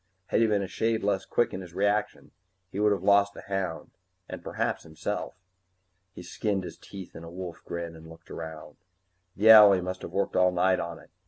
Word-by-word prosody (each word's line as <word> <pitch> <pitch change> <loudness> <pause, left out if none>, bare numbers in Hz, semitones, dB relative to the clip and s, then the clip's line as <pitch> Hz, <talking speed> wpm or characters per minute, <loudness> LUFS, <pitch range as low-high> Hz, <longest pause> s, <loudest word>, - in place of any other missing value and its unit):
Had - - +2
he 115 - +4
been 105 -2 +1
a - - -4
shade 110 +3 -1
less 100 -1 0
quick 120 - 0
in 95 - -4
his 85 -2 -12
reactions, 105 +2 -1 0.4
he 100 - -5
would 105 0 +4
have 100 -3 -1
lost 100 0 +4
the - - -10
hound 95 -4 -4 0.4
and - - -7
perhaps - - -2
himself. 80 -1 -5 0.8
He - - -9
skinned 100 +2 -2
his - - -8
teeth 95 -3 -11
in 80 - -9
a 85 - -9
wolf 90 -1 -7
grin 85 -1 -5
and 80 0 -13
looked 80 0 -15
around. 80 -1 -8 0.6
The 110 +3 +6
owlie 105 -3 +9
must 90 0 -5
have - - -6
worked 95 +2 -1
all 90 0 +4
night 90 +1 +2
on 85 -1 -5
it. - - -18
95 Hz, 210 wpm, -27 LUFS, 85-100 Hz, 0.8 s, owlie